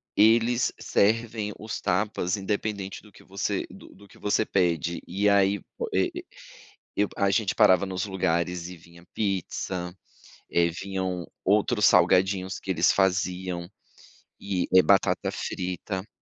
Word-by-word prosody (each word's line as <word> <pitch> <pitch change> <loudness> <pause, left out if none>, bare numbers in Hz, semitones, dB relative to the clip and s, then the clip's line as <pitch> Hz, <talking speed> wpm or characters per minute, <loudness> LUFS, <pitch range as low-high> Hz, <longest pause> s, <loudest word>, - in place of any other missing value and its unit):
eles 115 +3 +4
servem 110 0 +1
os 110 0 -5
tapas 95 0 0
independente 100 -1 -3
do 105 - -18
que - - -18
você 100 +1 -3
do - - -13
do - - -18
do 100 - -17
que - - -19
você 105 +1 +1
pede 85 -2 0
e 100 +3 0
aí, 100 0 +3 0.2
o 470 - -3
eh, 365 - +2 0.9
e 105 - +3
a 100 0 +2
gente 100 0 +1
parava 95 +1 +5
nos 95 0 -3
lugares 90 -2 -1
e 90 - -9
vinha 85 +1 -17
pizza, 95 -2 -3 0.5
eh, 85 0 +3
vinham 95 -1 -4 0.2
outros 105 +2 +3
salgadinhos 95 0 +3
que 95 - -7
eles 85 0 +3
faziam 90 -2 -1 0.7
e 95 -3 -2
batata - - +2
frita. 95 +2 -4
95 Hz, 135 wpm, -26 LUFS, 90-105 Hz, 0.9 s, parava